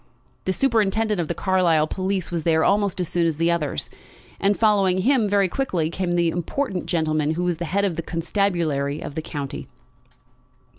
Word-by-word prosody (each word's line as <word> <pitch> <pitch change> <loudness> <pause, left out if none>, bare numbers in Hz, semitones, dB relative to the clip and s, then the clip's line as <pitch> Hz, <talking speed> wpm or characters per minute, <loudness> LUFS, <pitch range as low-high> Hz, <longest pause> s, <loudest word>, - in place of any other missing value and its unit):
The 190 - +1
superintendent 220 -4 +1
of 165 - -3
the 170 - -3
Carlisle 180 -5 +2
police 190 +2 -2
was 170 -1 -1
there 160 0 +2
almost 200 -2 +1
as 180 - -1
soon 170 0 +1
as 160 -3 -1
the 165 +1 +2
others; 150 - -1 0.5
and 200 +1 +2
following 195 -4 +3
him 250 -5 +3
very 200 -1 +3
quickly 175 -8 -1
came 180 -1 -2
the 170 -1 +2
important 185 - -3
gentleman 155 -2 0
who 175 - -1
was 175 -2 -1
the 175 - -2
head 200 +4 0
of 175 -5 -2
the - - -1
constabulary 165 -5 -1
of - - -7
the 160 - -3
county. 145 -3 -6
175 Hz, 185 wpm, -23 LUFS, 160-200 Hz, 0.5 s, following